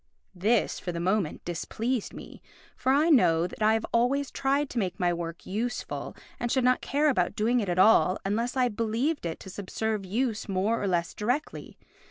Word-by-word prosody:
This, 210 Hz, +5 st, +1 dB
for 180 Hz, -, -4 dB
the 170 Hz, -, -4 dB
moment, 185 Hz, -1 st, -1 dB
displeased 220 Hz, +7 st, -2 dB
me, -, -, -11 dB, 0.3 s
for 260 Hz, -, 0 dB
I 300 Hz, +5 st, +4 dB
know 170 Hz, -, +4 dB
that 180 Hz, -, -8 dB
I 215 Hz, +1 st, +4 dB
have 225 Hz, -, -1 dB
always 265 Hz, +4 st, +1 dB
tried 280 Hz, +2 st, 0 dB
to 245 Hz, -, -1 dB
make 185 Hz, -3 st, -2 dB
my 175 Hz, -1 st, +2 dB
work 170 Hz, 0 st, -6 dB
useful 230 Hz, +5 st, -4 dB, 0.2 s
and 240 Hz, -1 st, -2 dB
should 260 Hz, -, +2 dB
not 250 Hz, 0 st, +3 dB
care 295 Hz, +2 st, +1 dB
about 185 Hz, -12 st, +1 dB
doing 235 Hz, +4 st, +2 dB
it 205 Hz, -5 st, -2 dB
at 175 Hz, -, -1 dB
all 185 Hz, -2 st, +5 dB
unless 230 Hz, +6 st, -1 dB
I 255 Hz, -1 st, +3 dB
believed 230 Hz, -, -1 dB
it 165 Hz, -, -5 dB
to 190 Hz, -, -9 dB
subserve 210 Hz, +2 st, -3 dB
use 220 Hz, +2 st, -2 dB
more 195 Hz, +4 st, 0 dB
or 200 Hz, -, -1 dB
less 175 Hz, -2 st, 0 dB
directly. 250 Hz, +8 st, -3 dB
220 Hz, 195 wpm, -27 LUFS, 185-250 Hz, 0.3 s, all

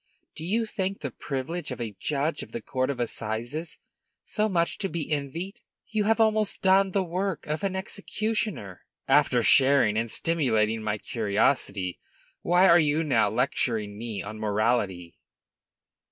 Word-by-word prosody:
Do -, -, -7 dB
you 220 Hz, +7 st, 0 dB
think 195 Hz, -2 st, -3 dB
the 140 Hz, -, -3 dB
privilege 145 Hz, +7 st, -4 dB
of 125 Hz, -, -5 dB
a 110 Hz, -4 st, -4 dB
judge 150 Hz, +2 st, -1 dB
of -, -, -10 dB
the 235 Hz, -, -4 dB
court 130 Hz, 0 st, -1 dB
of 135 Hz, -3 st, -3 dB
assizes 120 Hz, +7 st, -3 dB, 0.5 s
so 215 Hz, 0 st, 0 dB
much 170 Hz, -3 st, 0 dB
to 195 Hz, -, -1 dB
be 155 Hz, -1 st, -4 dB
envied? 155 Hz, +7 st, -3 dB, 0.3 s
You 215 Hz, -2 st, 0 dB
have 225 Hz, +2 st, +2 dB
almost 215 Hz, -2 st, +2 dB
done 195 Hz, +1 st, +5 dB
the 190 Hz, +1 st, +1 dB
work 185 Hz, -1 st, -3 dB
of 155 Hz, +5 st, -3 dB
an 195 Hz, -1 st, -1 dB
executioner." 200 Hz, -, -3 dB, 0.3 s
"After 135 Hz, -3 st, +4 dB
sharing 130 Hz, -4 st, +5 dB
and 115 Hz, +1 st, 0 dB
stimulating 115 Hz, -9 st, +1 dB
my 105 Hz, -1 st, -1 dB
curiosity, 100 Hz, -4 st, 0 dB, 0.4 s
why 180 Hz, +2 st, +4 dB
are 170 Hz, -1 st, +7 dB
you 155 Hz, +1 st, +2 dB
now 125 Hz, -9 st, +2 dB
lecturing 110 Hz, -3 st, 0 dB
me 110 Hz, -1 st, -5 dB
on 110 Hz, +1 st, -7 dB
morality?" 105 Hz, -5 st, -1 dB
140 Hz, 155 wpm, -27 LUFS, 110-190 Hz, 0.5 s, are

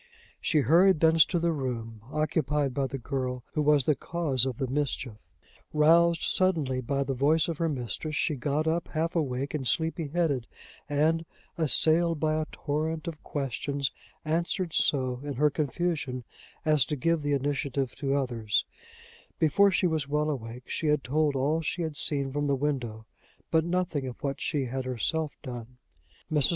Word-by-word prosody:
She 155 Hz, -5 st, +2 dB
hurried 170 Hz, -, +5 dB
thence 160 Hz, 0 st, +6 dB
to 180 Hz, -, -1 dB
the 170 Hz, 0 st, +1 dB
room 115 Hz, -7 st, -4 dB
occupied 150 Hz, -3 st, 0 dB
by 135 Hz, 0 st, 0 dB
the 135 Hz, -, -5 dB
girl 125 Hz, -1 st, -3 dB
who 155 Hz, -, +1 dB
was 150 Hz, -2 st, +4 dB
the 150 Hz, -, +3 dB
cause 140 Hz, -5 st, 0 dB
of 125 Hz, -3 st, -3 dB
the 135 Hz, -, -1 dB
mischief. 130 Hz, -4 st, -2 dB, 0.5 s
Roused 165 Hz, +2 st, +4 dB
suddenly 155 Hz, -9 st, +1 dB
by 140 Hz, +3 st, -1 dB
the 135 Hz, 0 st, -2 dB
voice 150 Hz, +5 st, +3 dB
of 165 Hz, -3 st, -4 dB
her 165 Hz, -1 st, +1 dB
mistress, 140 Hz, +3 st, -3 dB
she 155 Hz, -, +1 dB
got 145 Hz, +3 st, -1 dB
up 165 Hz, +1 st, 0 dB
half 165 Hz, +2 st, -1 dB
awake, 140 Hz, -4 st, -1 dB
and 140 Hz, -4 st, -2 dB
sleepy 160 Hz, +1 st, 0 dB
headed; 145 Hz, -6 st, 0 dB, 0.4 s
and, 155 Hz, +3 st, +2 dB, 0.3 s
assailed 160 Hz, +2 st, +3 dB
by 155 Hz, 0 st, +1 dB
a 155 Hz, -, -4 dB
torrent 155 Hz, +3 st, -2 dB
of 160 Hz, -2 st, -6 dB
questions, 140 Hz, 0 st, -2 dB, 0.3 s
answered 170 Hz, +2 st, -1 dB
so, 130 Hz, -3 st, +2 dB
in 145 Hz, -1 st, -4 dB
her 150 Hz, +3 st, +3 dB
confusion, 150 Hz, -4 st, -2 dB, 0.4 s
as 155 Hz, -3 st, +4 dB
to 150 Hz, -, -2 dB
give 165 Hz, +3 st, +1 dB
the 145 Hz, 0 st, 0 dB
initiative 140 Hz, -2 st, -1 dB
to 140 Hz, -1 st, 0 dB
others: 120 Hz, -6 st, 0 dB, 0.7 s
before 180 Hz, +6 st, +4 dB
she 190 Hz, 0 st, +1 dB
was 160 Hz, -4 st, 0 dB
well 150 Hz, +1 st, +1 dB
awake, 120 Hz, -2 st, -7 dB
she 160 Hz, -, -2 dB
had 150 Hz, -2 st, +2 dB
told 150 Hz, +1 st, +1 dB
all 145 Hz, +5 st, +1 dB
she 170 Hz, +2 st, -2 dB
had 160 Hz, -2 st, -4 dB
seen 140 Hz, -2 st, +2 dB
from 145 Hz, +1 st, -1 dB
the 140 Hz, -, +2 dB
window, 125 Hz, -6 st, -2 dB, 0.5 s
but 160 Hz, -1 st, +4 dB
nothing 170 Hz, -5 st, -1 dB
of 125 Hz, -, -9 dB
what 140 Hz, -1 st, -2 dB
she 145 Hz, -4 st, 0 dB
had 130 Hz, +2 st, -3 dB
herself 145 Hz, +5 st, -2 dB
done. 125 Hz, -2 st, -8 dB, 0.5 s
Mrs. 150 Hz, -3 st, +4 dB
145 Hz, 170 wpm, -28 LUFS, 135-160 Hz, 0.7 s, thence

